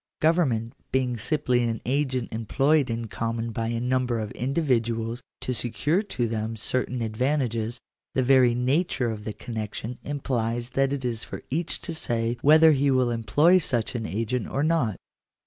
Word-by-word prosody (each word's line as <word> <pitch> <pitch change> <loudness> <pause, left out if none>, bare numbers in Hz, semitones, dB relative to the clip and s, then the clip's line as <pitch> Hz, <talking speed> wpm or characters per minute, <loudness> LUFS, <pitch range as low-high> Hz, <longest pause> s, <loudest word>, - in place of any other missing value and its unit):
Government 135 -9 +2 0.2
being 130 -2 +1
simply 125 -1 +1
an 115 -2 -1
agent 130 -3 -1
employed 135 +6 +2
in 115 0 -2
common 115 +1 -3
by 115 +1 -2
a 115 0 -1
number 125 0 0
of 110 -2 -4
individuals 120 -4 -1 0.2
to 130 - -2
secure 135 - 0
to 125 - -2
them 110 0 -3
certain 125 +1 -1
advantages, 115 -1 -1 0.4
the 130 - +3
very 125 -2 +5
nature 130 0 +1
of 105 -1 -7
the 110 - -3
connection 110 +2 -6
implies 120 -4 -2
that 135 +1 +1
it 140 -2 -3
is 115 -2 -1
for - - -8
each 165 +4 -1
to 170 - -5
say 120 -6 0
whether 155 +2 +7
he 140 -1 +2
will 130 -2 +3
employ 145 - +4
such 120 -9 0
an 115 -3 -3
agent 115 +5 -2
or 140 - -1
not. 155 - +1
125 Hz, 165 wpm, -26 LUFS, 115-140 Hz, 0.4 s, whether